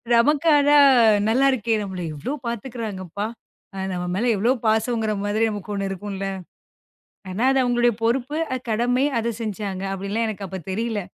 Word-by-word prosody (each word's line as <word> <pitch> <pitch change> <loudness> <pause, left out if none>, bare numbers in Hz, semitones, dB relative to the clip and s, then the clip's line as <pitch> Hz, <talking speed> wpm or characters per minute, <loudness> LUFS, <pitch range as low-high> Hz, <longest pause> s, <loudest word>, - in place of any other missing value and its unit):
நமக்கு 295 +7 +3
ஆனா 290 0 +4 0.5
நல்லாயிருக்கே! 250 -2 +2
நம்மள 190 -2 -5
எவ்ளோ 150 - -4
பாத்துக்குறாங்கப்பா! 210 -5 -5 0.7
நம்ம 180 -1 -3
மேல 225 - 0
எவ்ளோ 230 +6 +2 0.2
பாசம்ங்கிற 220 0 +1
மாரி 210 +2 0
நமக்கு 210 -1 -6
ஒண்ணு 195 -1 -2
இருக்கும்ல! 195 +1 -5 1.1
ஆனா, 195 +5 -3
அது 270 - +2
அவங்களுடைய 240 -1 +2
பொறுப்பு, 255 +5 0 0.2
அ - - 0
கடமை, 245 +4 +1
அதைச் 230 -1 -2
செஞ்சாங்க. 200 -3 -4
அப்படிலாம் 200 +4 -2
எனக்கு 205 -2 -5
அப்பத் 190 -1 -8
தெரியல. 220 +2 -2
220 Hz, 140 wpm, -23 LUFS, 195-240 Hz, 1.1 s, ஆனா